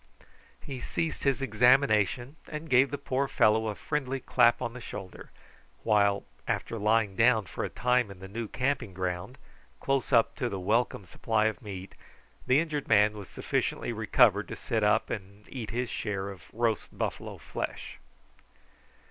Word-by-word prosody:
He 135 -2 -7
ceased 160 +5 -3
his 135 0 +2
examination 125 - +3
and 150 -1 -7
gave 130 +2 +5
the 145 - -3
poor 140 0 -1
fellow 110 -2 +3
a 105 - -2
friendly 135 -1 -2
clap 120 -2 +3
on 115 - -3
the 125 - -9
shoulder, 95 -5 -8 0.5
while, 100 -2 +3 0.2
after 115 - -2
lying 105 -1 +2
down 115 -1 +4
for 85 - -5
a - - -2
time 125 -2 +1
in 100 - -10
the 95 - -9
new 110 +3 -5
camping 125 -4 -2
ground, 90 +6 -3 0.4
close 135 -1 -1
up 115 -3 +4
to 125 - -1
the 100 - -4
welcome 105 +1 0
supply 110 +3 0
of 110 +3 -1
meat, 95 -4 -8 0.5
the 130 +2 +5
injured 155 -3 -2
man 105 -1 +5
was 105 -3 -9
sufficiently - - -2
recovered - - +3
to - - -6
sit 110 -2 -2
up, 105 +2 +2
and 100 0 -7
eat 120 -5 -6
his 125 +2 -2
share 100 -2 -3
of 90 -4 -12
roast 115 -2 0
buffalo - - -4
flesh. - - -6
115 Hz, 165 wpm, -29 LUFS, 105-130 Hz, 0.5 s, gave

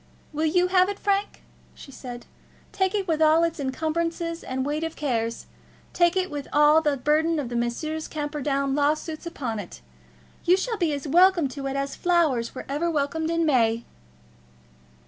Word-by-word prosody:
"Will 310 +2 0
you 360 +3 +2
have 370 0 +4
it, 405 - -4
Frank?" 400 0 -1 0.3
she 275 - -12
said. 245 -2 -9 0.5
"Take 380 +1 0
it 395 -2 -1
with 320 -2 0
all 315 +1 +5
its 335 -1 -1
encumbrances 330 +4 -2
and 260 0 -3
weight 300 +2 -2
of 325 0 -4
cares. 230 -5 -2 0.5
Take 345 +1 +3
it 370 0 0
with 290 -2 -5
all 300 +2 +5
the 295 -3 +1
burthen 310 +5 +1
of 265 -5 -3
Messrs. 240 +7 -2
Camperdown's 290 -2 -2
lawsuits 310 +3 -1
upon 240 -9 -4
it. 175 - -9 0.6
You 360 +2 +4
shall 450 +3 -2
be 340 -5 +1
as 285 +1 -4
welcome 350 0 +5
to 275 +1 -5
it 270 - -3
as 275 0 -2
flowers 315 -11 +1
were - - -6
ever 295 +5 -1
welcomed 320 +1 -1
in 335 0 +1
May." 235 -5 +2
310 Hz, 170 wpm, -25 LUFS, 275-335 Hz, 0.6 s, all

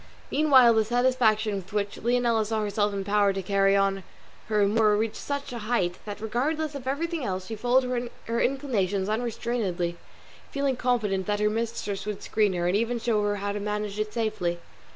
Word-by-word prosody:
Meanwhile 265 -6 +6
the 220 -1 +3
satisfaction 230 -2 +2
with 195 +1 -9
which 205 -1 -2
Leonela 235 -1 +2
saw 215 +1 -1
herself 205 0 0
empowered 200 0 +1
to 195 - -3
carry 195 +1 +3
on 195 0 +2 0.5
her 210 -2 +2
amour 210 +1 +3
reached 220 0 -1
such 280 -3 -4
a 240 - -4
height 210 -6 -1
that, 205 -1 -6
regardless 290 +8 -1
of 270 -2 -7
everything 325 +3 -2
else, 185 -3 -3
she 225 - -5
followed 245 +1 +1 0.2
her 230 +1 -1
inclinations 205 -8 0
unrestrainedly, 215 -6 -2 0.5
feeling 280 -1 0
confident 220 -7 0
that 205 0 0
her 210 0 +2
mistress 225 -3 -3
would 210 -2 -4
screen 210 -3 +1
her, 175 -1 -1
and 180 - +1
even 230 +3 0
show 225 -2 +1
her 205 0 0
how 205 0 -3
to 205 - -3
manage 210 0 -3
it 215 0 -2
safely. 215 -7 -1
215 Hz, 180 wpm, -26 LUFS, 200-245 Hz, 0.5 s, Meanwhile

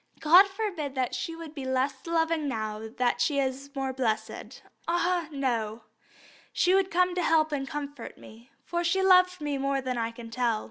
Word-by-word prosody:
God 355 +6 +7
forbid 385 -9 -4
that 255 -2 -1
she 330 - -3
should 330 -2 -9
be 280 -4 -6
less 260 +2 -1
loving 325 -2 +1
now 220 -3 -4
that 245 -1 +1
she 280 +4 +1
is 275 0 -2
more 270 -1 -2
blessed. 235 -4 -3 0.2
Ah, 345 0 +1
no! 235 -6 -2 0.7
she 360 - +2
would 385 -1 +3
come 360 0 +2
to 360 - -1
help 315 -2 +3
and 275 -2 -2
comfort 285 -1 -6
me, 230 +4 -15 0.2
for 345 0 -2
she 380 +3 +1
loved 365 -1 +5
me 290 -2 -2
more 275 0 0
than 255 -2 -3
I 230 0 -1
can 230 0 -10
tell." 230 -2 0
280 Hz, 185 wpm, -28 LUFS, 255-340 Hz, 0.7 s, God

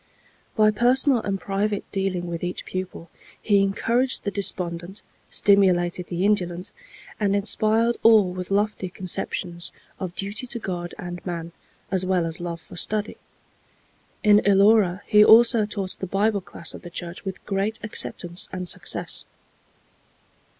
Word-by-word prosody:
By 215 -1 +5
personal 250 +4 +4
and 195 -3 -3
private 200 +1 -2
dealing 190 -3 -2
with 170 -1 -5
each 180 0 -4
pupil, 185 -3 -6 0.3
he 200 -2 +3
encouraged 235 +6 0
the 205 - -2
despondent, 180 -1 -3 0.3
stimulated 180 -3 +3
the 180 +2 -1
indolent, 180 -3 0 0.5
and 200 -2 +1
inspired 220 +3 +1
all 215 -5 +5
with 180 -1 -6
lofty 200 -1 0
conceptions 180 -1 -3 0.3
of 185 -2 -5
duty 205 +5 -4
to 240 - -4
God 175 -5 -5
and 175 0 -7
man, 170 -2 -5 0.4
as 190 -1 0
well 185 -2 +1
as 165 +1 -4
love 170 -1 -5
for - - -13
study. 210 +3 -2 1.1
In 210 -1 +6
Elora 200 -2 +4
he 210 -1 +6
also 230 0 +6
taught 200 -3 -4
the 190 - -4
Bible 200 +2 +1
class 170 -2 -3
of - - -10
the 175 - -9
church 175 0 -7
with 190 -1 -7
great 200 +2 -1
acceptance 175 -4 -1
and 180 -1 -5
success. - - -1
195 Hz, 145 wpm, -24 LUFS, 180-210 Hz, 1.1 s, In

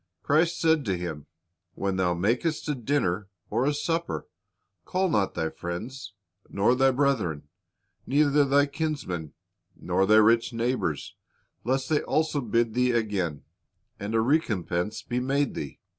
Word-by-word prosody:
Christ 165 +4 +2
said 160 -2 +3
to 95 -4 0
him, 80 -4 -6 0.5
"When 95 -1 -1
thou 90 -2 +1
makest 120 - 0
a 150 - +1
dinner 115 -7 -1 0.2
or 120 +5 +1
a 145 - +2
supper, 165 +3 -2 0.6
call 185 - 0
not 105 - +1
thy 80 - -1
friends, 105 +9 -6 0.4
nor 100 +5 +2
thy 135 +1 +4
brethren, 115 - 0 0.6
neither 145 +1 +4
thy 140 +1 +4
kinsmen, 140 - -3 0.4
nor 95 - 0
thy 110 - +6
rich 115 +2 +4
neighbors, 115 - -1 0.5
lest 130 +2 0
they 155 -2 +2
also 155 -2 0
bid 115 -1 +1
thee 125 +1 +2
again, 100 -10 -1 0.6
and 105 +3 -3
a 110 - +4
recompense 110 - 0
be 120 +2 -2
made 135 +2 0
thee. 70 - -6
120 Hz, 145 wpm, -27 LUFS, 95-145 Hz, 0.6 s, thy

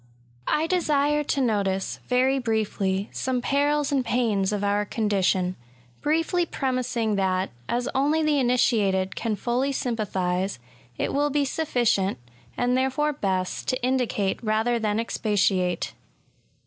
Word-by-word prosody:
I 310 - +2
DESiBB 295 -4 +1
to 275 - +1
notice^ 200 -5 0
very 260 +2 +2
briefly^ 210 -4 -1
some 260 -1 -1
perils 285 +3 +1
and 275 -2 +2
pains 225 -5 +1
of 205 -1 -2
our 205 +1 +1
condition, 195 -4 0 0.2
— 120 -1 -31
^briefly 330 +3 +1
premising 250 -5 -1
that^ 190 -1 +1 0.2
as 245 +1 0
only 295 +4 +2
the 300 -2 +2
initiated 225 -7 +2
can 225 -3 -1
fully 250 +6 0
sympathise, 195 - -1 0.4
it - - -1
will 290 +1 +2
be 290 0 +1
sufficient^ 240 -9 +1 0.4
and 245 0 +1
therefore 265 +3 +1
best^ 190 -7 -2
to 255 -1 -2
indicate 245 -6 0
rather 220 +2 +1
than 215 -1 0
expatiate. 195 -6 0
235 Hz, 130 wpm, -25 LUFS, 200-270 Hz, 0.4 s, I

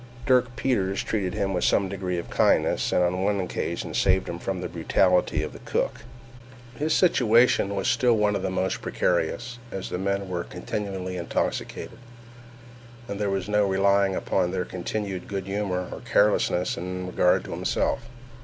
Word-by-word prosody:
Dirk 125 -3 +3
Peters 100 -7 0
treated 100 -4 -2
him 100 -2 -1
with 90 - 0
some 100 - +3
degree 95 -2 -3
of 85 - -6
kindness, - - +2
and 90 - +3
on 90 +2 0
one 100 0 +1
occasion 90 - -3
saved - - +2
him - - -5
from - - -3
the - - -3
brutality 90 -1 +2
of - - -5
the - - -10
cook. - - -2 0.7
His 150 +5 -1
situation 120 - +4
was 95 - -1
still 120 -2 +3
one 105 -1 +2
of - - -1
the 95 - -1
most 95 0 -1
precarious, 120 -1 -1
as 95 - -5
the 90 - -3
men 100 0 -1
were 90 -2 -3
continually 95 -3 -4
intoxicated, 85 - -3 1.1
and 100 - -5
there 105 -1 0
was 95 -1 -2
no 105 -1 +2
relying 100 0 +3
upon 90 -2 0
their 90 0 -2
continued 95 +1 -4
good 95 -2 -4
humor 95 -2 -2
or - - -6
carelessness 100 -3 +2
in 90 +1 -4
regard 90 0 +2
to - - -9
himself. - - -1
95 Hz, 170 wpm, -25 LUFS, 90-105 Hz, 1.1 s, situation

